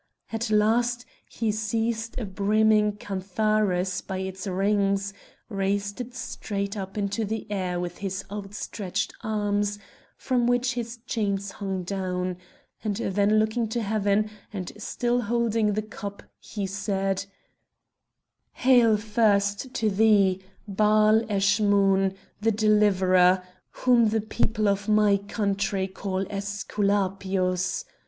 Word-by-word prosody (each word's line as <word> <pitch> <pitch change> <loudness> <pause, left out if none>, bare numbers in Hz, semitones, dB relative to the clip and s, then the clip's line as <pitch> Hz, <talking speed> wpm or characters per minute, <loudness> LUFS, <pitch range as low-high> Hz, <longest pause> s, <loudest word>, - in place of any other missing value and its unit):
At 225 +1 -2
last 235 +3 +2 0.2
he 225 -2 -1
seized 225 +2 -2
a 235 - -3
brimming 210 +2 +3
cantharus 195 -2 0
by 190 - -5
its 190 +1 -5
rings, 200 +1 +1 0.3
raised 200 +1 -2
it 245 +1 -8
straight 200 -5 -4
up 195 0 -6
into 200 +2 -1
the 220 +1 -3
air 185 -3 -1
with 175 0 -5
his 195 -1 -4
outstretched 200 -1 -4
arms, 205 -1 -1 0.4
from 245 -2 0
which 245 +1 +2
his 235 -1 -4
chains 200 -3 -1
hung 195 -3 -4
down, 180 -1 -2 0.5
and 210 -2 -1
then 205 0 +1
looking 220 +2 +1
to 235 +2 -2
heaven, 210 0 +1 0.2
and 190 -4 -5
still 240 +3 -1
holding 225 -2 +1
the 215 +1 -1
cup 205 -1 -8 0.2
he 205 -2 -5
said: 195 0 -1 1.3
"Hail 240 -4 +5
first 210 +1 +1
to 220 -2 +1
thee, 200 -2 +4 0.3
Baal 215 +2 +4
Eschmoun, 200 -1 +3 0.3
the 225 +1 +3
deliverer, 190 -4 +4 0.3
whom 240 -3 +3
the 220 0 +1
people 215 0 0
of 200 +1 0
my 210 -1 +4
country 200 -1 -1
call 190 0 -3
Æsculapius! 195 - -1
205 Hz, 120 wpm, -26 LUFS, 195-220 Hz, 1.3 s, Hail